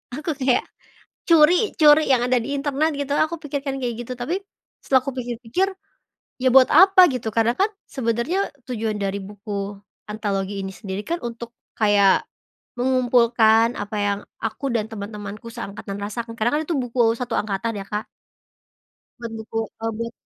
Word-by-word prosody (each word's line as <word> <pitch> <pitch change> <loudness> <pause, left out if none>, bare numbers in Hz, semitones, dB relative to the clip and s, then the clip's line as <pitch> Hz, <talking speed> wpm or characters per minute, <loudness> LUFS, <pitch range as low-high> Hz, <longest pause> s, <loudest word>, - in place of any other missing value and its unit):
aku 305 +3 -5
kayak, 260 -1 +2 0.7
curi 335 +6 +5
curi 300 -1 +7
yang 250 -2 +4
ada 250 0 +3
di 230 - -6
internet 290 +3 0
gitu 285 0 -3
aku 315 +3 +1
pikirkan 280 -1 -3
kayak 245 -2 -2
gitu 240 +1 -6
tapi, 320 +11 -2 0.4
setelah 265 -1 +3
aku 275 - -3
pikir-pikir, 245 +10 -1 0.7
ya 255 - +4
buat 260 +1 +6
apa 375 +2 +8
gitu 230 -3 -3
karena 230 +2 +2
kan 390 - +1 0.2
sebenernya 260 - -1 0.2
tujuan 225 -4 -2
dari 200 0 -2
buku 200 0 -6 0.3
antologi 200 -2 -2
ini 190 - -6
sendiri 200 0 -6
kan 340 +1 -3
untuk 235 0 -7 0.2
kayak, 205 -3 +4 0.5
mengumpulkan 240 -2 +3
apa 205 +1 -4
yang 200 0 0 0.2
aku 225 +5 -4
dan 220 -3 0
teman-temanku 205 0 -7
seangkatan 200 -1 -7
rasakan 230 +3 -5
karena 230 +2 +1
kan 310 - 0
itu 340 - -2
buku 240 -2 +2
1 245 -1 -5
angkatan 210 +1 -2
ya - - -9
Kak. 210 +2 -4 1.1
Buat 235 -1 -6
buku 220 0 -5 0.3
e - - 0
buat 230 0 -4
235 Hz, 155 wpm, -22 LUFS, 210-270 Hz, 1.1 s, apa